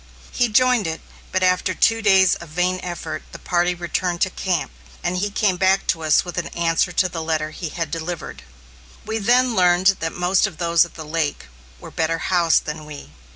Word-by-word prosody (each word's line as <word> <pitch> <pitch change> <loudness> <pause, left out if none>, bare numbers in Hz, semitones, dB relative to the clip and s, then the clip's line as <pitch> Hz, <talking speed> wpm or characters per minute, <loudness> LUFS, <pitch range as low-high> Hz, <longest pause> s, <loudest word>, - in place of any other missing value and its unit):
He 245 -2 +1
joined 250 -2 +3
it, 160 0 -4 0.3
but 185 0 0
after 185 0 +1
two 225 0 +2
days 190 -3 +5
of 170 - -7
vain 180 +3 0
effort, 175 -1 -5
the - - -7
party 175 0 0
returned 175 0 -2
to 190 - +2
camp, 180 - -2 0.3
and 180 - -1
he 205 +3 -1
came 200 -2 0
back 190 +1 +2
to 165 - -13
us 155 +1 +3
with 175 0 -4
an 170 - -4
answer 170 +1 +1
to 185 +2 +2
the 165 -2 -5
letter 155 -1 -2
he 165 0 -6
had 165 -2 -4
delivered. 165 +1 -5 0.6
We 220 +1 -2
then 245 +4 +3
learned 180 +1 +4
that 165 0 -2
most 180 +3 +2
of 180 -6 -10
those 170 0 +3
at 170 - -15
the 160 - -8
lake 155 -1 -2 0.3
were - - -11
better 165 0 -1
housed 170 -2 +2
than 150 0 -6
we. 145 - -10
175 Hz, 200 wpm, -21 LUFS, 165-190 Hz, 0.6 s, days